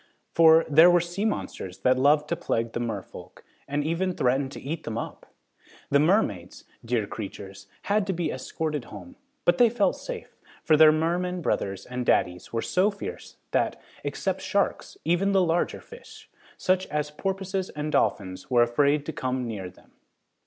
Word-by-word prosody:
For, 165 0 +6
there 160 +4 +7
were 175 0 +5
sea 175 +5 -3
monsters 95 - -3
that 130 +3 +3
loved 150 +2 +4
to 170 - +1
plague 115 -8 -2
the - - -3
merefolk, 110 -6 -6 0.2
and 145 +1 -1
even 175 +4 -1
threatened 135 +2 +1
to - - -7
eat 160 +4 -5
them 115 - -4
up! - - -6 0.6
The 140 - +5
mermaids, 145 - +1 0.2
dear 115 -2 0
creatures, 100 -1 -8 0.2
had 205 0 +1
to 190 - 0
be 170 -1 -2
escorted 150 +1 -4
home, 265 - -11 0.3
but 175 0 +3
they 240 - +7
felt 220 -3 +1
safe, - - -8 0.3
for 155 - +4
their 155 0 +8
mermen 175 +3 -1
brothers 95 -7 -2
and 125 0 -4
daddies 90 -6 +1
were 115 0 -2
so 185 +3 +2
fierce 320 - -8
that, - - 0 0.2
except - - -2
sharks, - - -1
even 195 +4 +2
the 190 -1 +4
larger 170 0 0
fish, 475 +1 -14 0.3
such 185 0 +1
as 150 0 -2
porpoises 190 +3 -3
and 150 +1 -4
dolphins 95 -8 -1
were 120 -2 +5
afraid 140 +5 +2
to 160 - -4
come 130 -1 -2
near 100 -6 -5
them. 90 - -22
150 Hz, 170 wpm, -26 LUFS, 120-180 Hz, 0.6 s, their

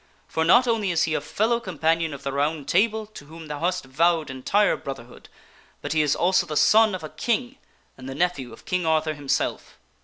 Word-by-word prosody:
For 160 - -1
not 240 +10 +5
only 225 -4 0
is 165 -2 +1
he 165 - 0
a - - 0
fellow 225 +9 0
companion 165 -5 0
of 140 -1 -9
the 140 - -2
Round 145 +1 -1
Table, 215 +3 +1
to 210 -9 -13
whom 160 +2 -11
thou 150 -1 -5
hast 180 -1 -1
vowed 160 +2 +1
entire 195 +11 +1
brotherhood, 130 -3 -9 0.5
but - - -4
he 155 - +3
is 145 -2 +1
also 185 +2 +2
the 150 0 -3
son 210 +7 +5
of 180 - -8
a 155 - -6
king 245 +3 -2 0.4
and 130 +1 -8
the 135 - -6
nephew 145 -7 -1
of 115 - -14
King 180 -1 -1
Arthur 155 -1 +1
himself." 145 -2 -3
160 Hz, 210 wpm, -24 LUFS, 145-190 Hz, 0.5 s, not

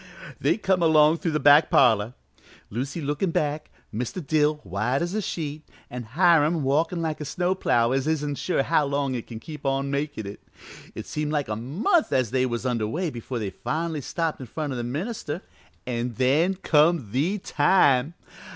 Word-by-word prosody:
"They - - +2
come 190 -4 +1
along 160 -1 +5
through 165 -1 -2
the 155 - +1
back 145 +2 +6
parlor, 115 -2 +3 0.6
Lucy 135 +9 -4
lookin' 150 +6 -1
back, 150 -1 -2 0.2
Mr. 125 - -4
Dill 150 +1 +2
white 105 - -1
as 175 +2 -3
a 215 - 0
sheet, 155 -5 -4 0.3
an' 125 0 -5
Hiram 165 -3 +4
walkin' 160 +5 +1
like 155 -1 -3
a - - -2
snow 175 +6 -1
plough 120 -10 +1
as 135 +2 0
isn't 150 -3 -1
sure 175 -7 0
how 155 0 +2
long 140 -1 -1
it 120 -3 -5
can 115 -2 -8
keep 150 +4 -10
on 135 0 -1
makin' 145 -5 -3
it. 100 +1 -8 0.5
It - - -6
seemed 150 0 -3
like 145 -5 -1
a 105 - -1
month 175 - 0
as 130 -4 +1
they 130 0 +1
was 120 0 -4
under 115 -4 0
way 165 - -2
before 120 +1 -6
they 105 -4 -3
finally 160 0 -3
got 140 - -9
stopped 165 -2 -2
in 130 - -8
front 150 +3 -4
o' - - -4
the 120 - -3
minister. 160 - -4 0.4
An' 120 -1 -3
then 150 +9 +2
come 155 - +2
the 155 - 0
time! 145 -4 +2
145 Hz, 190 wpm, -25 LUFS, 125-165 Hz, 0.6 s, back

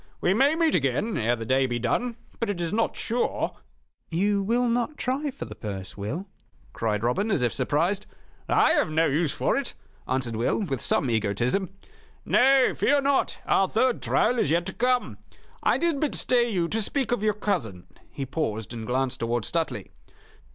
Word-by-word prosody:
"We 180 - +2
may 275 +8 +3
meet 325 -2 +2
again 150 - 0
ere 120 +1 +1
the 115 -1 -6
day 130 +3 +2
be 120 -1 -2
done; 230 - -1 0.2
but 230 - -1
it 200 -4 -2
is 170 +2 -2
not 225 +1 0
sure 240 +2 -1 0.2
" - - -42 0.2
"You 200 +4 +1
will 240 +5 +1
not 240 +5 -1
try 275 +4 -1
for 275 - -7
the - - -8
purse, 95 -3 -7
Will?" 120 - -4 0.5
cried 110 -2 -1
Robin, 160 - +1
as 175 - +1
if 120 - +1
surprised. 165 +10 0 0.4
"I - - +4
have - - +2
no 160 +1 +2
use 155 +1 +1
for - - 0
it," 275 -3 -2 0.3
answered 125 -3 -1
Will, 115 +2 +1
with 135 - -3
some 140 - +2
egotism, 115 - 0 0.6
"Nay, 265 0 +4
fear 285 +1 +2
not, 280 0 +1
our 195 -1 +3
third 255 +1 +1
trial 245 - +2
is - - +2
yet 170 +2 +2
to 190 - -5
come. 250 0 0 0.4
I - - +3
did 335 -4 0
but 300 -1 0
stay 240 -1 +3
you 180 -6 0
to 225 - 0
speak 255 +3 -1
of 245 - +1
your 210 -1 +1
cousin 120 - -2
" - - -27
He 135 - -4
paused, 110 -7 -3
and 110 -2 -6
glanced 130 +1 -1
towards 115 -1 -1
Stuteley. 165 -2 -2
175 Hz, 195 wpm, -26 LUFS, -, 0.6 s, I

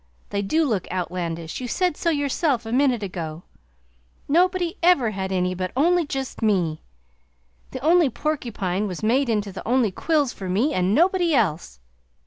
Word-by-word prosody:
They 200 - -1
do 310 +11 +1
look 215 - -1
outlandish, 170 -1 -4
you 250 - -4
said 360 +5 0
so 335 - -1
yourself 285 -4 0
a 225 - -5
minute 250 -3 +2
ago. 170 -3 -5 0.8
Nobody 350 +2 +2
ever 335 -10 +4
had 190 -1 -4
any 180 -1 0
but 185 0 -4
only 340 +2 +3
just 270 -3 -5
me! 180 -8 +1 0.9
The - - -6
only 330 0 +4
porcupine 215 -9 -2
was 185 +1 -6
made 250 +4 +2
into 210 -3 -1
the 190 - -7
only 240 -3 +2
quills 290 - 0
for 190 -2 -7
me 230 +12 +1
and 185 +1 +1
nobody 350 0 +3
else! 165 - -1
230 Hz, 160 wpm, -23 LUFS, 185-300 Hz, 0.9 s, ever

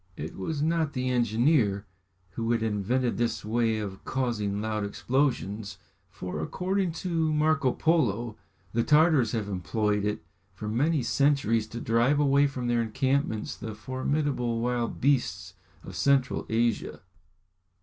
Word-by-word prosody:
It 80 +3 -6
was 145 +9 -3
not 160 -2 +1
the 130 -1 -1
engineer 115 -3 +2 0.5
who 115 +2 -3
had 115 -1 0
invented 115 +4 0
this 120 -3 -1
way 115 0 +1
of 100 -3 -6
causing 110 -6 -1
loud 110 0 -2
explosions, 105 -3 -1 0.3
for, 90 -4 -6
according 185 - -1
to 165 -3 +1
Marco 150 -3 +2
Polo, 120 - +1 0.4
the 115 - +2
Tartars 150 -6 +4
have 110 -3 -1
employed 105 +3 -1
it 105 -5 -2 0.3
for 105 +2 -6
many 140 +6 +1
centuries 120 -3 +2
to 115 - -7
drive 120 +6 +2
away 140 0 +4
from 130 -3 -5
their 120 -1 +2
encampments 130 0 -1
the 110 -1 -7
formidable 130 0 -1
wild 120 0 -1
beasts 95 -10 0 0.3
of - - -9
Central 140 -2 +2
Asia. 115 0 0
120 Hz, 135 wpm, -27 LUFS, 110-140 Hz, 0.5 s, Tartars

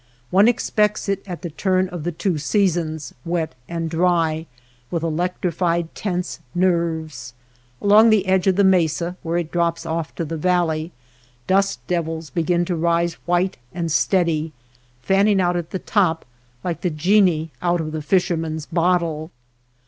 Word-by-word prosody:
One 195 +4 +6
expects 210 -3 +1
it 195 -1 0
at 180 0 -7
the 170 - -4
turn 185 +3 +1
of 175 -4 -6
the 175 - -1
two 170 0 -1
seasons, 160 - 0
wet 165 -3 -2 0.2
and 165 -1 -2
dry, 165 -1 +1 0.4
with 170 -2 -2
electrified 170 0 -1
tense 180 -3 -3 0.2
nerves. 160 -8 -1 0.4
Along 210 +3 +6
the 215 -3 +3
edge 185 0 +2
of 190 - +4
the 200 - +3
mesa 175 -2 +2
where 170 0 -1
it 170 -2 -3
drops 170 -1 0
off 165 -1 -3
to 165 - -2
the 165 +1 -4
valley, 170 -1 0 0.5
dust 195 +1 +1
devils 165 -3 -3
begin 170 +2 +1
to 175 - -1
rise 170 +1 +1
white 175 +2 +1 0.2
and 170 -2 -2
steady, 165 -2 +1 0.5
fanning 195 +3 +3
out 175 -1 +2
at 175 -2 -3
the - - -3
top. 180 -4 +1 0.4
like 170 -3 -3
the 180 - 0
genii 165 -1 +2
out 175 0 +1
of 155 -1 -3
the 155 0 -4
Fisherman's 160 -2 0
bot 175 +2 +2
tle. 160 -1 -4
170 Hz, 155 wpm, -21 LUFS, 160-185 Hz, 0.5 s, One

